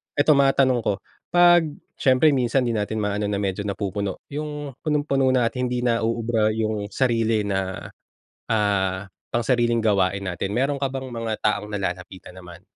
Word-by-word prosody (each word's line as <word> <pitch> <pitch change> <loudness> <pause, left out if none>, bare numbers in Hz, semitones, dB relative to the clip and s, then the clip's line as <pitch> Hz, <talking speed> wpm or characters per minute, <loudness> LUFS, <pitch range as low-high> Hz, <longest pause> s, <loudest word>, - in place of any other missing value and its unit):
ito 145 +2 +4
matanong 135 -2 +3
ko, 105 - 0 0.4
'pag 175 -1 +5 0.3
siyempre 135 +3 +4
minsan 130 -1 +1
di 120 - 0
natin 110 0 -2
ma-ano 105 0 -1
na 100 -1 -1
medyo 100 0 -2
napupuno 100 -1 -3
'yung 150 -1 -5
punong-puno 145 -3 +1
na 125 -2 +3
at 115 - -1
hindi 125 -1 -1
na 115 -2 +2
uubra 115 -1 +1
'yung 110 -1 -2
sarili 115 -2 +1
na, 95 -2 -2 0.6
ah, 100 -3 0 0.2
pangsariling 120 0 +2
gawain 100 -2 +1
natin, 95 +2 -3
meron 135 +4 0
ka 135 - +2
bang 130 0 -4
mga 115 -2 -3
taong 105 0 0
nalalapitan 90 -1 -5
naman? 90 -1 -12
115 Hz, 155 wpm, -23 LUFS, 100-130 Hz, 0.6 s, pag